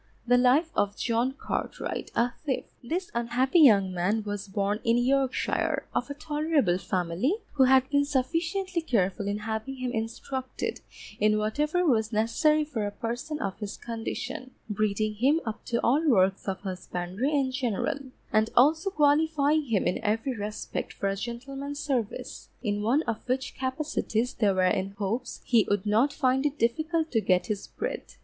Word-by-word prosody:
The 245 0 +4
Life 260 +7 +4
of 205 0 +1
JOHN 235 +2 0
CARTWRIGHT, - - -4
a 240 +1 +2
Thief 280 -4 -1 0.2
This 350 +9 -3
unhappy 245 +7 +2
young 200 - +6
man 195 +5 0
was 205 -1 -4
born 200 +2 -1
in 230 +1 +3
Yorkshire, 275 +4 +1
of 245 - -1
a 285 - -4
tolerable 295 - +1
family, 185 - 0 0.2
who 270 -3 +4
had 260 0 +5
been 285 0 +4
sufficiently 330 +7 -1
careful 200 - 0
in 205 0 -1
having 220 +5 -4
him 255 -1 -3
instructed 250 +3 -4 0.4
in 215 0 +3
whatever 295 +12 0
was 220 -7 +2
necessary 235 +8 +2
for 230 -9 -2
a - - -4
person 245 +8 -4
of 195 -7 -3
his 210 -2 -5
condition, 245 +3 -5 0.2
breeding 215 0 0
him 265 +9 +3
up 220 -2 -5
to 235 -1 0
all 280 +7 +3
works 195 -5 +3
of 190 -1 -2
husbandry 185 +5 -3
in 275 -3 +1
general, 255 +2 -1 0.3
and 215 +1 +3
also 315 +9 +5
qualifying 300 -2 +3
him 225 -6 +1
in - - 0
every 225 +5 -1
respect 210 0 -4
for 195 - -1
a 195 - -1
gentleman's 270 +6 -5
service; 260 -8 -3
in 205 -2 -1
one 250 +9 +2
of 230 -2 -2
which 255 +1 -1
capacities 260 -3 -1
they 210 -3 +2
were 185 -1 +1
in 190 +1 +1
hopes 215 +5 -3
he 230 -4 +4
would 205 -1 +1
not 225 +7 +3
find 265 -2 +1
it 295 +1 -5
difficult 315 +7 0
to 225 - +2
get 185 -3 +2
his 210 -3 -3
bread. - - -4
245 Hz, 165 wpm, -28 LUFS, 210-285 Hz, 0.4 s, young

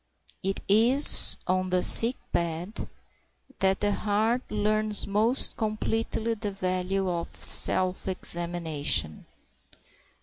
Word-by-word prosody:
It 195 0 -5
is 235 +8 +5
on 185 0 -3
the 180 0 -1
sick 235 +3 +7 0.2
bed 170 +4 -5 0.7
that 190 0 -1
the 205 0 -1
heart 215 +5 -3
learns 215 0 -2
most 220 +6 -2
completely 225 +1 -4
the 210 -1 -7
value 190 0 -4
of 170 -2 -5 0.2
self 185 0 +4
examination. 170 - -3
195 Hz, 100 wpm, -24 LUFS, 180-215 Hz, 0.7 s, sick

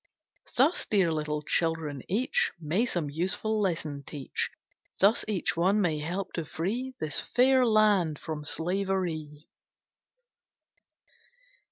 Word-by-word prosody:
Thus, 280 +8 +3
dear 190 -6 +3
little 150 -1 -2
children, 160 -3 0
each 350 - +1
May 170 +10 0
some 165 -9 -2
useful 190 +7 -1
lesson 160 -7 -1
teach; 140 -1 -3 0.5
Thus 205 +4 +4
each 205 -5 0
one 190 +5 +3
may 165 -6 +1
help 180 +5 -4
to 165 - -2
free 230 - -3
This 155 -1 -2
fair 255 0 +3
land 205 -8 +3
from 155 -1 -5
slavery. 165 -3 -2
175 Hz, 115 wpm, -28 LUFS, 155-215 Hz, 0.5 s, Thus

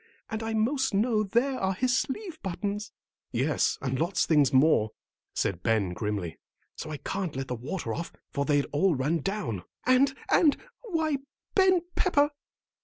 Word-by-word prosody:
And 220 0 -2
I 225 0 -2
'most 260 +2 +1
know 215 +1 +3
there 245 +6 +1
are 190 0 0
his 255 +4 +2
sleeve 340 +6 -3
buttons." 205 +3 -3 0.4
"Yes, 135 +6 +1
and 130 -1 -1
lots 175 +4 +1
of - - -4
things 150 -4 +5
more," 130 -5 +4 0.5
said 95 -4 -1
Ben, 110 -5 +2
grimly, 100 -4 -3 0.4
"so - - -6
I 155 - -4
can't 190 0 -3
let 135 0 -4
the - - -1
water 140 +10 -4
off, 170 - -4 0.2
for 140 - 0
they'd 145 -1 +2
all 165 +3 +3
run 145 +6 +1
down." 170 - -3 0.2
"And, 265 +2 +4 0.2
and, 300 -4 +5 0.2
why, 320 - 0 0.4
Ben 375 -2 +5
Pepper!" 290 -5 +3
190 Hz, 165 wpm, -28 LUFS, -, 0.5 s, things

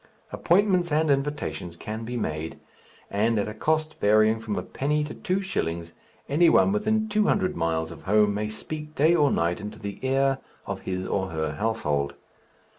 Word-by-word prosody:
Appointments 180 -2 +2
and 155 0 +3
invitations 135 - -2
can 110 +5 -6
be 120 +1 -4
made; 80 -6 -3 0.5
and 110 +3 +2
at 100 - 0
a 105 - -5
cost 155 +7 -1
varying 110 +2 +4
from 110 -2 -3
a - - -2
penny 150 +2 -1
to 150 - -5
two 185 +2 -1
shillings 85 - -3 0.3
any 165 +4 +4
one 195 - +5
within 215 +1 +1
two 215 0 +2
hundred 185 -3 +1
miles 80 -1 -1
of - - -10
home 105 +1 +4
may 105 +1 -2
speak 150 +7 -7
day 160 +4 +4
or 150 -4 +4
night 85 -4 0
into 105 0 -7
the 100 -1 -6
ear 135 0 +2 0.3
of - - -4
his 95 0 -2
or 95 -1 -1
her 80 -2 -2
household. 75 -8 -1
115 Hz, 180 wpm, -26 LUFS, 95-155 Hz, 0.5 s, one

